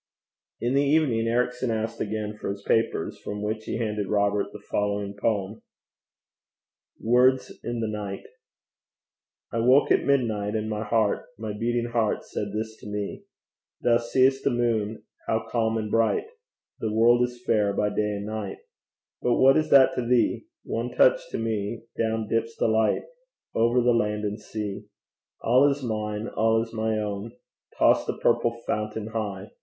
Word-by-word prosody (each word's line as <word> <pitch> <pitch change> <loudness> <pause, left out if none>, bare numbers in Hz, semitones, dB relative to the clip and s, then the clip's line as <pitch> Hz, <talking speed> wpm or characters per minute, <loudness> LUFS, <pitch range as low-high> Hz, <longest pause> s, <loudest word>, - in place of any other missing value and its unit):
In 120 +2 0
the 140 - +4
evening 140 -6 +2
Ericson 125 +1 0
asked 110 0 -2
again 105 0 -3
for 105 - -5
his 100 0 -5
papers, 115 +2 0
from 105 0 -5
which 110 +1 -3
he - - -3
handed 105 -3 -2
Robert 100 0 +1
the - - -8
following 100 -1 -2
poem: 100 0 -1 1.4
WORDS 125 +3 +3
IN 120 -1 -3
THE 110 - -1
NIGHT. 105 -2 -5 1.3
I 115 - 0
woke 130 +5 +4
at - - +4
midnight, 110 -7 +1
and 110 0 -1
my 105 0 -2
heart, 110 -1 +1
My 110 -1 -4
beating 120 +2 -1
heart 115 -3 0
said 100 -1 -4
this 110 +1 -4
to - - -12
me: 105 -1 -4 0.6
Thou 115 -1 +4
seest 130 +3 +2
the - - +3
moon 115 -3 -1 0.2
how 110 0 0
calm 115 -1 0
and 105 -1 -3
bright 115 - +2 0.5
The 110 - -2
world 120 +2 +4
is 125 0 -2
fair 105 -3 +2
by 105 +1 0
day 105 0 -1
and 100 0 -5
night, 105 -2 -4 0.6
But 125 - +2
what 135 +1 +6
is 155 - +1
that 135 -1 +7
to - - -1
thee? 125 - +1 0.2
One - - -3
touch - - +4
to - - -3
me 110 0 -2
down 110 -1 -1
dips 115 +1 -1
the - - +2
light 110 0 +2 0.5
Over 120 +2 +3
the 120 0 +4
land 105 -2 0
and 105 +1 -3
sea. 105 -1 -5 0.5
All 130 +5 +5
is 140 0 -2
mine, 105 -1 -3
all 110 0 +2
is 115 - -11
my 110 -1 0
own! 105 +1 -4 0.4
Toss - - +4
the - - -2
purple 115 0 +1
fountain 105 0 -2
high! 105 -3 -4
110 Hz, 165 wpm, -26 LUFS, 105-120 Hz, 1.4 s, that